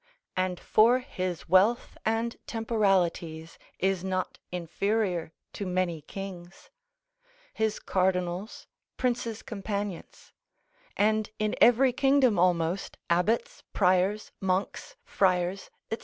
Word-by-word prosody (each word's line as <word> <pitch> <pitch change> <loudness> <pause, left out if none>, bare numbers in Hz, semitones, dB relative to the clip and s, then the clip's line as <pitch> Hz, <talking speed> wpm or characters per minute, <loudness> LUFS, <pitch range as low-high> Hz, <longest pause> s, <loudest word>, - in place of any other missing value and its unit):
And 185 -1 -1
for 230 +4 +4
his 185 -9 -4
wealth 195 +7 +3
and 225 +1 0
temporalities, 185 -8 0 0.2
is 190 -1 0
not 185 -1 -2
inferior 180 0 -1 0.2
to 200 - -4
many 180 -3 -1
kings: 185 +2 -9 0.8
his 220 -1 0
cardinals, 185 +2 -1 0.3
princes' 240 -3 -1
companions; 200 -3 -5 0.6
and 215 +1 +2
in 215 0 -1
every 245 +2 +6
kingdom 270 -7 +3
almost, 175 +1 +1
abbots, 225 - +1
priors, 190 +2 +2
monks, 190 - -2
friars, 185 0 +1 0.2
&c. 225 - -2
195 Hz, 95 wpm, -28 LUFS, 180-220 Hz, 0.8 s, every